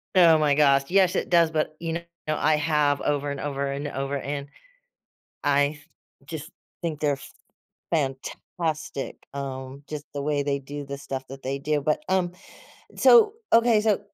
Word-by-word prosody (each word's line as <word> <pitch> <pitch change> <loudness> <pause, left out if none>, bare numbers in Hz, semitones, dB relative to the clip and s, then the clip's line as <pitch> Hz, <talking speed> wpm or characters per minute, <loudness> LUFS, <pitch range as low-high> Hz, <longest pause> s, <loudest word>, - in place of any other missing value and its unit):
Oh 170 -3 +7
my 150 -2 +3
gosh, 140 -2 +4
yes, 185 0 +4
it - - -1
does, 170 -2 +5
but, 155 -1 -1
you 165 -1 -3
know, 170 - -2 0.3
I 155 0 +2
have 150 -2 +2
over, 145 -1 0
and 140 - -5
over, 140 -1 -2
and 140 +2 -3
over, 135 0 -3
and, 140 +1 -4 1.0
I 145 0 +3
th 145 - -21 0.4
just 160 +1 -7 0.3
think 160 -3 -3
they're 145 -2 0 0.7
fantastic, 150 +1 -3 0.2
um, 135 0 -6
just 150 -1 -6
the 140 - -2
way 145 -1 +1
they 140 0 0
do 145 +2 -7
the 140 0 -6
stuff 135 -1 -6
that 135 0 -10
they 135 +1 -2
do, 145 +1 0
but, 150 +1 0
um 185 -2 +2 0.7
So, 440 -3 +7 0.2
okay, 230 -1 +5
so, 210 -1 +2
145 Hz, 165 wpm, -25 LUFS, 140-160 Hz, 1.0 s, Oh